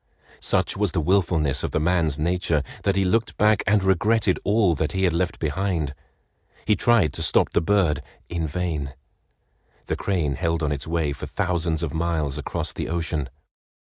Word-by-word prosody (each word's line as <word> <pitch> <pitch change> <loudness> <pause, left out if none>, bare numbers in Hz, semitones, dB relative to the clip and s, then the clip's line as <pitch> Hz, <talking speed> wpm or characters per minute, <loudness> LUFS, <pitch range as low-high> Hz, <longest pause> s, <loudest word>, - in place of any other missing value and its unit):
Such - - +1
was 100 -2 0
the 90 - +1
willfulness 80 -5 +1
of - - -1
the - - -1
man's 80 -3 +1
nature 85 -2 0 0.2
that 100 -1 +2
he 95 -1 +2
looked 105 +3 0
back 105 0 +4
and 100 -1 +3
regretted 100 +1 +2
all 100 -4 +3
he 80 +6 -1
had 90 -3 +3
left 85 +1 -1
behind. 80 -2 -1 0.7
He 105 - +3
tried 100 -7 +3
to - - -5
stop - - +3
the - - +2
bird 90 -3 +2 0.3
in 85 -2 -2
vain. 75 -4 -3 0.9
The - - -2
crane 85 -8 -1
held 85 +1 -1
on 75 - 0
its 70 +1 -3
way 80 -3 0
for - - -7
thousands 85 -2 -1
of 75 - -3
miles 80 -4 -1
across - - -2
the - - -4
ocean. 80 -4 -2
85 Hz, 175 wpm, -24 LUFS, 75-95 Hz, 0.9 s, back